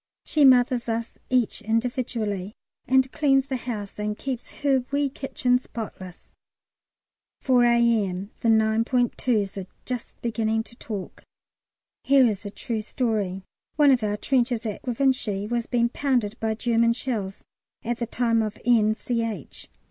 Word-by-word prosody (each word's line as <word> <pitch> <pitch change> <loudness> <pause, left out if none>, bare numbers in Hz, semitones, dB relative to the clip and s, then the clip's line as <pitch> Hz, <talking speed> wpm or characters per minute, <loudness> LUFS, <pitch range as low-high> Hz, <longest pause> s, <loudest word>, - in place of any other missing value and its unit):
She 300 - +2
mothers 250 -2 +4
us 230 0 -3
each 250 -3 +1
individually, 225 -3 -2 0.3
and 260 0 +3
cleans 270 -3 +3
the 270 - -3
house 220 -5 -5
and 210 0 -2
keeps 260 -3 -5
her 270 -3 +3
wee 280 0 +1
kitchen 250 -2 0
spotless. 195 -7 -8 1.1
4 250 -2 +4
A.M. 225 -5 +2
The 230 - +1
9.2's 220 -1 +1
are 190 - -7 0.2
just 250 -2 -5
beginning 225 -1 0
to 235 - -14
talk. 210 -5 -7 0.8
Here 270 -1 +5
is 210 -2 -1
a - - -4
true 225 +2 -4
story. 210 -5 -2 0.3
One 290 -1 +6
of 255 -3 +3
our 210 -1 -1
trenches 240 -1 0
at 210 -2 -4
Givenchy 245 -5 0
was 235 +1 -2
being 235 -1 +2
pounded 245 -6 0
by 220 -1 -1
German 230 0 +2
shells 220 -6 -4 0.4
at 235 +1 -2
the 235 - -2
time 230 -1 +1
of 215 -1 -3
N. 220 -3 +4
Ch. 230 - -4
235 Hz, 140 wpm, -25 LUFS, 215-250 Hz, 1.1 s, One